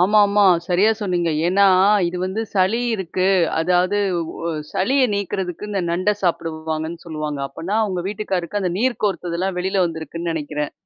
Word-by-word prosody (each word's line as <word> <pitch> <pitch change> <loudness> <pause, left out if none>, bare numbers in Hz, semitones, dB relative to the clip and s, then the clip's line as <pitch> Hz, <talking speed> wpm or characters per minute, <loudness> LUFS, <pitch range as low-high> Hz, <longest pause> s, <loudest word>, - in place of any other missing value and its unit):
ஆமாமா, 205 +2 +4 0.2
சரியா 190 +4 +3
சொன்னீங்க. 175 -5 0 0.2
ஏன்னா, 200 +3 +4 0.4
இது 180 - -5
வந்து 195 +4 -2
சளி 205 +5 +2
இருக்கு. 185 0 -1 0.3
அதாவது, 180 +4 +2 0.3
வொ 170 - -4 0.2
சளிய 260 +7 +2
நீக்குறதுக்கு 190 0 -3
இந்த 195 -2 -1
நண்ட 185 +4 +1
சாப்பிடுவாங்கன்னு 160 -1 -2
சொல்லுவாங்க. 155 -3 -4
அப்பனா, 185 +10 -3
உங்க 180 -2 -2
வீட்டுக்காரருக்கு 200 -1 -2
அந்த 180 -2 -1
நீர் 250 +1 0
கோர்த்ததுலாம் 180 -1 -1
வெளில 190 0 +1
வந்திருக்குன்னு 165 +1 -4
நினைக்கிறேன். 150 -1 -3
185 Hz, 140 wpm, -21 LUFS, 170-200 Hz, 0.4 s, ஆமாமா